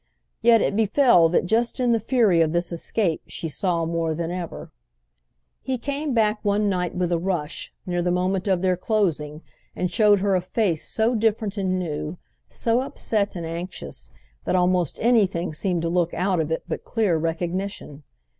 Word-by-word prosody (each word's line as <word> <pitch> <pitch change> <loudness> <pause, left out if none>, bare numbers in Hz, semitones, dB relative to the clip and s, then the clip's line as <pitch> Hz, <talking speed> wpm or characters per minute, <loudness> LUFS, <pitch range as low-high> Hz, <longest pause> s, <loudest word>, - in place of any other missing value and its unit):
Yet 230 -1 +5
it - - 0
befell 215 - +4
that 175 - +1
just 230 +7 0
in 245 -1 +2
the 230 - +3
fury 220 -7 +3
of 160 -1 +2
this 175 0 -1
escape 170 0 -1
she 165 - -5
saw 170 +1 -1
more 165 -1 -1
than 170 +1 -3
ever. 180 -2 -6 0.9
He 260 -1 -2
came 280 +2 -3
back 215 -1 +2
one 205 0 +1
night 180 -3 -1
with 180 -1 -1
a 170 - +1
rush, 170 -4 -3
near 175 -1 -1
the 180 - 0
moment 185 +2 0
of 190 -2 +1
their 185 -1 +3
closing, 170 -7 -1 0.3
and 180 - -2
showed 210 -2 +4
her 200 0 +2
a 185 - +2
face 185 -3 0
so 225 +2 +1
different 220 -2 0
and 190 -2 0
new, 160 -1 -4 0.3
so 230 +1 +1
upset 215 -6 -2
and 170 -2 -4
anxious, 170 +3 -6 0.4
that - - +1
almost 180 -3 +1
anything 195 -8 +2
seemed 175 +1 -1
to - - 0
look 170 -1 0
out 185 0 +1
of 160 -1 -1
it 160 - -2
but - - -4
clear 215 -7 +1
recognition. 165 -1 -3
185 Hz, 180 wpm, -24 LUFS, 170-215 Hz, 0.9 s, Yet